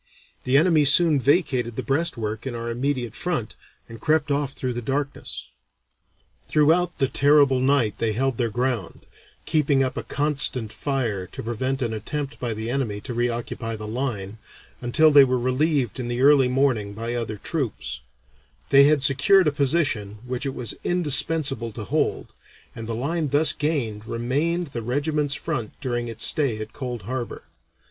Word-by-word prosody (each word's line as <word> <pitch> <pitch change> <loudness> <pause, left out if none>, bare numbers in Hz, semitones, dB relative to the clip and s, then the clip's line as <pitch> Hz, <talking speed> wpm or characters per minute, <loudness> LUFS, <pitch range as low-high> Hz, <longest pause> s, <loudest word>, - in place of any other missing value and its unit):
The 130 +2 +4
enemy 160 -1 +4
soon 150 +1 +6
vacated 130 -4 +1
the - - -3
breastwork 130 -7 -2
in 125 - -4
our 115 0 -4
immediate 125 -2 -2
front, 155 -11 -3 0.3
and 115 -1 -11
crept 155 -1 +1
off 140 -1 -1
through 130 -3 -3
the 120 - -4
darkness." 140 +4 -4 1.0
Throughout 165 +4 +2
the 135 - +1
terrible 140 -1 +4
night 130 -4 +1
they 115 -2 0
held 130 +1 -1
their 120 -2 +1
ground, 120 -5 -3 0.4
keeping 145 -3 +2
up 130 - -3
a - - -1
constant 135 -6 0
fire 115 -10 -2
to - - -8
prevent 130 +4 -2
an 115 -2 -2
attempt 140 +6 -5
by 120 -3 -2
the 110 +1 -4
enemy 120 -6 -2
to 120 - -6
reoccupy 120 -1 -2
the 110 0 -7
line, 110 -4 -4 0.4
until 155 +6 +4
they 145 -1 +8
were 130 -1 +1
relieved 130 0 0
in 125 - -3
the 120 +1 -2
early 140 -2 +6
morning 125 -6 0
by 115 +3 -4
other 115 -3 -3
troops; 135 - -3 0.7
they 140 0 +7
had 145 -2 +3
secured 145 +8 +4
a - - +3
position 135 -8 0
which 125 +2 -3
it 135 - -4
was 120 -4 -2
indispensable 150 -6 +1
to 110 - -6
hold, - - -2 0.4
and 115 -1 -7
the 115 - -2
line 155 +6 -1
thus 145 +3 +4
gained 120 -9 -2
remained 145 +8 -1
the 120 -3 -5
regiment's 145 +4 -1
front 130 -10 -4
during 120 -3 -3
its 115 0 0
stay 140 -8 +1
at 110 0 -7
Cold 125 -5 -5
Harbor. 120 +3 -5
130 Hz, 165 wpm, -23 LUFS, 115-145 Hz, 1.0 s, they